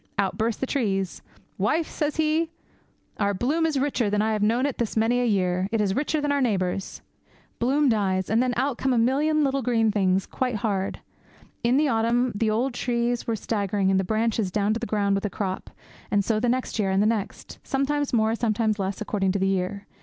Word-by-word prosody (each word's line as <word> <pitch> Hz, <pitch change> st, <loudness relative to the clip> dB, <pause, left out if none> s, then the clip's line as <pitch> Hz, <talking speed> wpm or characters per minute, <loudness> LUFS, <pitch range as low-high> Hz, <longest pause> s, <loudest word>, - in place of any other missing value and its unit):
Out 195 Hz, -2 st, 0 dB
burst 220 Hz, +1 st, -1 dB
the -, -, 0 dB
trees. 195 Hz, -9 st, -1 dB, 0.4 s
"Wife," 310 Hz, -, +1 dB
says 300 Hz, -1 st, -2 dB
he, 315 Hz, +1 st, +1 dB, 0.7 s
"our 200 Hz, -1 st, +1 dB
bloom 300 Hz, -, +1 dB
is 305 Hz, -3 st, -1 dB
richer 260 Hz, -5 st, 0 dB
than 205 Hz, +1 st, 0 dB
I 220 Hz, +1 st, +1 dB
have 210 Hz, -, -1 dB
known 230 Hz, +5 st, +2 dB
it 285 Hz, -, -3 dB
this 230 Hz, -2 st, -2 dB
many 230 Hz, +3 st, +2 dB
a -, -, +1 dB
year; 185 Hz, -3 st, +1 dB
it 225 Hz, -, 0 dB
is 200 Hz, -2 st, +1 dB
richer 300 Hz, +2 st, 0 dB
than 290 Hz, 0 st, 0 dB
our 285 Hz, -1 st, +1 dB
neighbours'!" 195 Hz, -5 st, -1 dB, 0.6 s
Bloom 280 Hz, +4 st, +2 dB
dies, 190 Hz, -5 st, +1 dB
and 225 Hz, +3 st, +2 dB
then 250 Hz, -2 st, 0 dB
out 265 Hz, 0 st, 0 dB
come 265 Hz, -1 st, +1 dB
about 235 Hz, -, +3 dB
a -, -, +4 dB
million 300 Hz, +4 st, +2 dB
little 275 Hz, -1 st, +1 dB
green 225 Hz, -3 st, +2 dB
things 190 Hz, -2 st, +1 dB
quite 250 Hz, -2 st, -2 dB
hard. 200 Hz, -3 st, -2 dB, 0.6 s
In 240 Hz, +3 st, +3 dB
the 300 Hz, +1 st, +3 dB
autumn 235 Hz, +1 st, +1 dB
the 215 Hz, +2 st, 0 dB
old 240 Hz, +5 st, 0 dB
trees 240 Hz, 0 st, -1 dB
were 230 Hz, -, 0 dB
staggering, 200 Hz, -3 st, 0 dB
and 190 Hz, -, +3 dB
the -, -, +1 dB
branches 220 Hz, 0 st, 0 dB
down 205 Hz, +3 st, +1 dB
to 225 Hz, -, -2 dB
the 235 Hz, -, -4 dB
ground 200 Hz, -2 st, +1 dB
with 195 Hz, -, -1 dB
the 210 Hz, -, -1 dB
crop; 190 Hz, -2 st, -4 dB, 0.4 s
and 200 Hz, -1 st, +1 dB
so 220 Hz, -2 st, +1 dB
the 240 Hz, +2 st, +1 dB
next 255 Hz, -1 st, -1 dB
year, 200 Hz, -2 st, +1 dB
and 190 Hz, +1 st, +2 dB
the -, -, +2 dB
next; 215 Hz, -2 st, -3 dB
sometimes 285 Hz, +1 st, -1 dB
more, 220 Hz, -2 st, +2 dB
sometimes 220 Hz, -2 st, 0 dB
less, 195 Hz, +1 st, -3 dB
according 195 Hz, -3 st, 0 dB
to -, -, 0 dB
the 195 Hz, 0 st, +1 dB
year. 195 Hz, +1 st, -2 dB
225 Hz, 220 wpm, -25 LUFS, 200-255 Hz, 0.7 s, a